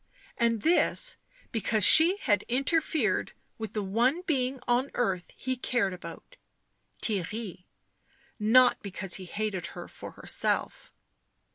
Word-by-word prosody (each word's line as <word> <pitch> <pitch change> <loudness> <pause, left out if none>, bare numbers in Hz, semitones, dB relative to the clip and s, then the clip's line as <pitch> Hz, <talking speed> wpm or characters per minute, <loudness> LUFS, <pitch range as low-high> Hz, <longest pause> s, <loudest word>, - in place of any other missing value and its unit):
And 230 -2 0
this 355 +8 +2 0.4
because 215 -2 +3
she 335 +5 +8
had 205 -6 +2
interfered 270 - 0 0.3
with 220 -1 -6
the 210 - -2
one 240 - 0
being 265 -6 -1
on 250 +3 +1
earth 190 -7 -2
he 260 0 -3
cared 240 -6 -1
about 170 -2 -11 0.3
— - - -37
Theirry; 200 -2 -4 0.7
not 245 +4 +4
because 195 -2 -3
he - - -8
hated 205 -1 -4
her - - -8
for - - -11
herself. - - -3
230 Hz, 125 wpm, -28 LUFS, 195-255 Hz, 0.7 s, she